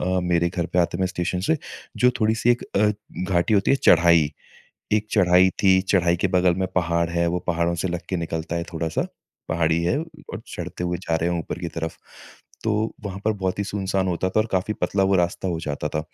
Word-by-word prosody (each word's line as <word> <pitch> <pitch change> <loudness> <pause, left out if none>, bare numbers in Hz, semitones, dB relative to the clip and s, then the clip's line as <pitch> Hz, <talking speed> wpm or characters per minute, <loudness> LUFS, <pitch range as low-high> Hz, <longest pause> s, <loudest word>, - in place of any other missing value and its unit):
अ, 90 0 0
मेरे 85 -1 +2
घर 85 -1 -2
पे 90 - -2
आते 85 0 0
में 95 - +1
स्टेशन 90 0 -2
से 160 - +4 0.4
जो 125 - +5
थोड़ी-सी 110 +2 +2
एक 120 - +2
अ, 105 +1 +4 0.4
घाटी 90 +4 +2
होती 100 - +3
है, 140 - +4
चढ़ाई। 85 - +5 0.6
एक 105 0 +2
चढ़ाई 90 -2 +5
थी। 95 -1 +5
चढ़ाई 90 -3 +2
के 95 - +3
बगल 90 -1 +3
में - - +1
पहाड़ 85 -1 +1
है 85 0 +1
वो 90 - 0
पहाड़ों 85 0 +1
से 95 - -1
लग 85 -1 -3
के 95 - 0
निकलता 80 0 -3
है 85 - -2
थोड़ा-सा। 80 -1 -2 0.4
पहाड़ी 80 0 +1
है 120 +12 +1
और 165 0 -9
चढ़ते 90 - -5
हुए 90 -1 -1
जा 85 -3 -2
रहे 85 +2 0
हैं 85 - -1
ऊपर 80 - -6
की 85 - -3
तरफ़। 80 0 -3 0.7
तो 110 - +1 0.3
वहाँ 100 -1 -5
पर 110 - +3
बहुत 95 +1 -1
ही 100 - 0
सुनसान 95 -1 -1
होता 90 +1 0
था 110 - +2
और 110 - 0
काफ़ी 95 +3 0
पतला 95 +2 +1
वो 100 - +3
रास्ता 85 +2 -1
हो 85 -2 -2
जाता 75 -1 -3
था। 75 +1 -1
90 Hz, 225 wpm, -23 LUFS, 85-95 Hz, 0.7 s, जो